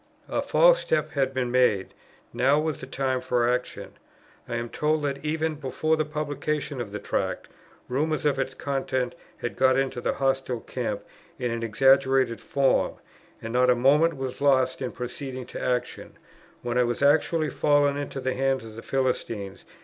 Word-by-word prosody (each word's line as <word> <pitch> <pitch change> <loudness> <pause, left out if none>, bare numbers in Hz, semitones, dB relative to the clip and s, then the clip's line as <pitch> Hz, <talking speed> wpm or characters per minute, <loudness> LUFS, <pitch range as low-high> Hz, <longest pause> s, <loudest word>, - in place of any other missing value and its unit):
A - - 0
false - - +5
step 155 -1 0
had 135 -2 0
been 130 -2 -2
made; 120 -7 +2 0.4
now 130 +5 +3
was 155 -2 -2
the 130 - -7
time 130 -1 -1
for 120 -1 +1
action. 125 +1 -2 0.6
I 120 - -2
am 120 0 -2
told 150 +4 0
that, 140 -1 -2
even 160 +1 -1
before 155 +2 -1
the 155 -1 0
publication 150 -2 -3
of 105 -4 -6
the 105 - -4
Tract, 105 - -2 0.4
rumours 150 +3 -1
of 140 -2 +2
its 130 -1 -2
contents 130 -2 -2 0.2
had 120 - -4
got 130 0 +4
into 135 -2 -1
the - - 0
hostile 135 -3 -1
camp - - -4 0.3
in 120 -1 -2
an 115 0 -3
exaggerated 130 0 +3
form; 140 -1 +1 0.5
and 115 +1 -5
not 125 0 +4
a 125 - +5
moment 145 +7 +4
was 130 -1 -5
lost 130 -2 +3
in 130 - -2
proceeding 130 +1 -6
to - - -8
action, 125 -1 -2 0.5
when 120 0 0
I - - +5
was 120 +3 -1
actually 155 +1 +3
fallen 145 0 +3
into 145 -1 -4
the 130 0 -1
hands 135 -2 0
of 110 -1 -10
the 115 - -8
Philistines. 115 -7 -2
135 Hz, 175 wpm, -26 LUFS, 125-145 Hz, 0.6 s, false